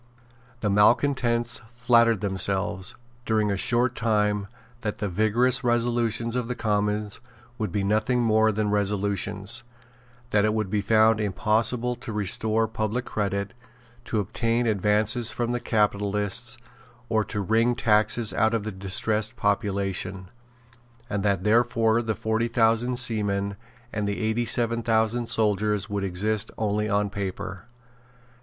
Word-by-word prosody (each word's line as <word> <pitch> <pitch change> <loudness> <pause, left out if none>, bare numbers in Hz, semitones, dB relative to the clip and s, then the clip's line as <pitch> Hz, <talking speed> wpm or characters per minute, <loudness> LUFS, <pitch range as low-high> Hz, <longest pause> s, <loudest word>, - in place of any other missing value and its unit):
The 105 - 0
malecontents 120 +2 +2
flattered 115 -2 +3
themselves, 95 0 0 0.3
during 110 -3 +1
a - - 0
short 120 +5 +1
time, 105 -3 0 0.3
that 105 -2 -3
the 105 - -2
vigorous 115 +6 +3
resolutions 120 -1 0
of 125 -2 -1
the 125 - -3
Commons 105 -1 -1 0.4
would 105 -4 -2
be 100 +2 -1
nothing 110 +5 +1
more 110 -1 +3
than 105 0 -1
resolutions, 100 +2 -1 0.7
that 105 -1 +3
it 110 0 +1
would 105 -4 -2
be 105 -1 +1
found 110 +1 +3
impossible 115 +4 0
to 120 -1 -7
restore 110 +2 0
public 110 +3 -3
credit, 100 -1 -2 0.5
to 110 - -1
obtain 115 +4 -1
advances 110 +3 +2
from 120 0 -2
capitalists, 105 +2 0 0.5
or 110 -2 +1
to 105 - -4
wring 115 +5 +2
taxes 110 0 +2
out 110 0 +2
of 110 - -2
the 110 - -4
distressed 105 +3 -1
population, 100 -3 -1 0.8
and 100 -1 -1
that 100 -2 0
therefore 115 +1 +2
the 110 -2 -2
forty 110 +2 -1
thousand 115 +1 +1
seamen 100 -4 +1 0.4
and 105 -1 -2
the 100 - -2
eighty 110 +1 0
seven 115 0 +1
thousand 115 +1 +1
soldiers 105 -1 +1
would 100 -1 -2
exist 100 +3 -1
only 105 0 -1
on 100 0 0
paper. 95 -2 -5
110 Hz, 135 wpm, -25 LUFS, 100-115 Hz, 0.8 s, flattered